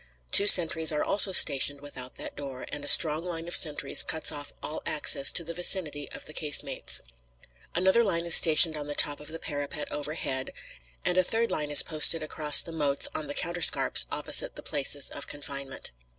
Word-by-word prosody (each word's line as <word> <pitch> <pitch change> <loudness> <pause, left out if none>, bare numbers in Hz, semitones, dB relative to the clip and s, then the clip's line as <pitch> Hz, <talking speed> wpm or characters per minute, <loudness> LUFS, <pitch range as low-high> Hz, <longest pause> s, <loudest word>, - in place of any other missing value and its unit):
Two 200 - +3
sentries 160 -4 +5
are 150 - -2
also 200 -1 +3
stationed 140 -4 +3
without 130 -3 -9
that - - -9
door, 135 -3 -9
and 145 - -7
a - - -6
strong 155 +2 +4
line 170 -2 -7
of 175 - -1
sentries 145 -3 +1
cuts 160 0 0
off 145 -1 -8
all 155 - -5
access 145 -2 +1
to 170 - -1
the 170 +1 -9
vicinity 165 -4 -1
of - - -9
the 155 - -11
casemates. 150 -2 0 0.7
Another 190 +6 +2
line 170 -5 0
is 170 - +2
stationed 160 0 +6
on 145 -1 -8
the 145 - -6
top 145 0 +2
of 150 - -14
the 160 - -7
parapet 145 -2 -7
overhead, 145 -3 -5 0.5
and 180 +1 0
a - - +2
third 230 +5 -2
line 150 -1 -3
is 145 - +6
posted 160 +1 +2
across 150 -1 +2
the 165 - -10
moats 145 -3 -2
on 155 - -5
the 145 - -7
counterscarps 170 -1 +2
opposite - - -1
the - - -10
places 140 0 -1
of 140 - -8
confinement. 140 -2 -8
150 Hz, 195 wpm, -26 LUFS, 145-170 Hz, 0.7 s, stationed